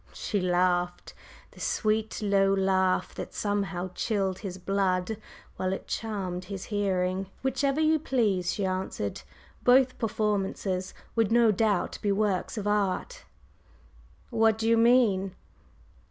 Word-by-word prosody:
She 205 - -2
laughed, 180 0 0 0.4
the - - -16
sweet, 220 0 -1
low 195 -1 +3
laugh 190 -1 +1
that - - -7
somehow 195 -3 -2
chilled 195 -4 -1
his 190 -3 -6
blood 190 +2 0 0.4
while 185 0 -1
it - - -5
charmed 190 -5 -3
his 195 -1 -6
hearing. 190 -2 0 0.2
"Whichever 270 +2 +1
you 315 0 +3
please," 210 - +1
she 200 - -2
answered. 185 - -3 0.4
"Both 255 +1 +4
performances 200 -4 -1 0.2
would 225 -2 +2
no 235 -1 +5
doubt 205 -2 0
be 205 - +1
works 200 0 0
of 210 - -3
art!" 205 - -1 1.1
"What 225 -2 +3
do 225 0 -1
you 230 - +5
mean?" 225 -5 +3
200 Hz, 125 wpm, -28 LUFS, 185-225 Hz, 1.1 s, no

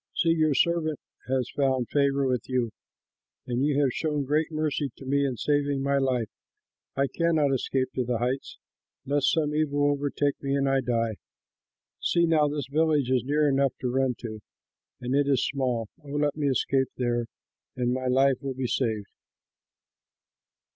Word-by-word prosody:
See, 165 - +2
your 155 -3 +2
servant 160 0 +1 0.3
has 130 -1 0
found 130 -4 +1
favor 140 -1 +2
with 125 -1 -1
you, 125 -3 0 0.7
and 125 +2 -1
you 145 -1 +2
have 130 -3 +1
shown 150 -3 -1
great 150 +4 0
mercy 155 -2 -1
to 135 - -11
me 140 +1 +1
in 130 -3 -3
saving 145 -1 0
my 140 0 +2
life. 125 -5 0 0.6
I 135 - +2
cannot 155 -2 +1
escape 130 0 -1
to 130 - 0
the 120 -1 -1
heights, 125 +3 -2 0.5
lest 140 0 +2
some 150 -2 0
evil 145 -1 +2
overtake 145 0 -1
me, 140 0 -1
and 140 0 +1
I 135 0 +2
die. 115 -3 -1 0.8
See 170 -1 +2
now, 155 -3 +3
this 145 -2 -3
village 150 -2 +1
is 125 -3 +2
near 150 +3 +2
enough 135 -1 +2
to 125 - -1
run 130 -1 +1
to, 110 -3 -6 0.6
and 125 +1 -3
it 140 0 +2
is 135 -3 +2
small. 125 -5 -1 0.2
Oh, 145 - -12
let 145 -1 +1
me 150 -2 -1
escape 135 0 +1
there, 120 -2 0 0.5
and 125 -1 0
my 130 0 -2
life 135 +1 +3
will 135 -2 -4
be 130 0 -2
saved." 110 -4 -1
135 Hz, 170 wpm, -27 LUFS, 125-145 Hz, 0.8 s, now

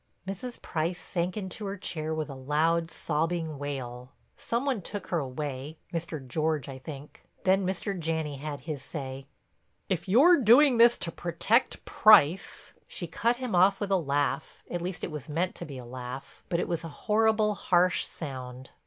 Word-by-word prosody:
Mrs. 220 +6 -5
Price 170 +2 -2
sank 180 +2 -2
into 200 +1 -4
her 195 +1 -4
chair 160 -4 -3
with 155 -1 -2
a 140 - -7
loud, 155 +5 +1
sobbing 160 -1 -1
wail. 130 -3 -5 0.3
Some 235 +3 -2
one 260 -7 0
took 205 +3 -6
her 170 - +1
away—Mr. 150 +3 -5
George, 155 +1 0
I 135 -1 -7
think. 140 +1 -10 0.2
Then 190 0 +3
Mr. 190 +1 -2
Janney 160 -3 -2
had 145 0 -5
his 150 -1 -5
say: 135 -2 -6 0.6
"If 185 -1 -1
you're 290 - +7
doing 250 +3 +6
this 235 +1 +7
to 165 - -4
protect 175 +9 +1
Price—" 195 -5 +4
She - - -4
cut 235 +1 +1
him 250 -2 -4
off 190 +2 +5
with 205 -1 -3
a - - +5
laugh, 145 -2 -1
at 175 - -2
least 175 -1 -5
it - - -3
was 150 -1 -7
meant 170 +5 0
to - - -7
be 140 -3 -8
a 125 - -8
laugh, 125 +2 -8
but 170 - +1
it - - -1
was 170 -1 -2
a 165 - -5 0.2
horrible, 215 0 +3
harsh 180 -2 +2
sound. 130 -3 -7
165 Hz, 175 wpm, -28 LUFS, 145-195 Hz, 0.6 s, you're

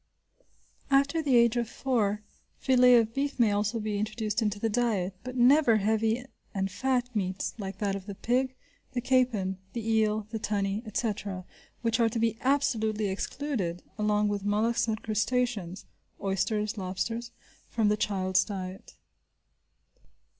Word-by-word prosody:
After 280 +4 +3
the 280 -5 +2
age 235 0 +5
of 235 -1 -1
four, 215 -6 0 0.3
filet 250 -1 +5
of 225 -1 +3
beef 280 +2 -1
may 225 -3 +5
also 210 +3 0
be 210 -1 -2
introduced 215 +1 -1
into 210 -2 -1
the 225 - +1
diet, 215 -5 0
but 255 +1 -6
never 250 -1 +6
heavy 220 +3 +1 0.3
and 195 0 -1
fat 250 +2 -1
meats 190 -2 -2
like 195 -1 -5
that 200 -2 -1
of 195 0 -7
the 200 - -6
pig, 255 +5 0 0.4
the 250 - 0
capon, 235 -7 +1
the 230 -2 -4
eel, 215 -1 +2
the 225 - -3
tunny, 200 -1 -1
etc., 205 -4 -3 0.4
which 230 0 +1
are 230 -1 +4
to 230 - -4
be 225 0 +1
absolutely 220 -6 +1
excluded 195 - -3 0.2
along 210 0 +2
with 205 -1 -2
mollusks 215 +4 +1
and 220 -1 -2
crustaceans, 220 -4 -1 0.3
(oysters, 210 +2 -1
lobsters), 225 +6 -3 0.4
from 225 -3 +1
the 210 - +3
child's 190 -3 +1
diet. 190 -2 -7
220 Hz, 145 wpm, -29 LUFS, 205-240 Hz, 0.4 s, never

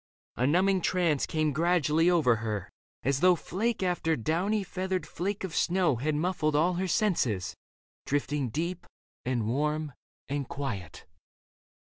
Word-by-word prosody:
A 125 - +1
numbing 185 +5 +3
trance 170 -6 +1
Came 155 -2 0
gradually 165 +1 +3
over 150 -10 +4
her, 110 -4 -4 0.3
as 135 +1 +1
though 180 +2 +6
Flake 205 +6 -2
after 175 -3 +1
downy 180 - 0
feathered 190 0 -2
flake 195 +3 -3
of 185 -4 -4
snow 175 -7 +2
Had 150 +5 -1
muffled 155 -2 0
all 170 +5 +3
her 185 +2 -1
senses, 130 - 0 0.5
drifting 145 -2 0
deep 170 +7 -3 0.4
And 120 -3 0
warm 150 +4 -1 0.3
and 140 -1 -3
quiet. 100 - -5
155 Hz, 135 wpm, -29 LUFS, 140-180 Hz, 0.5 s, though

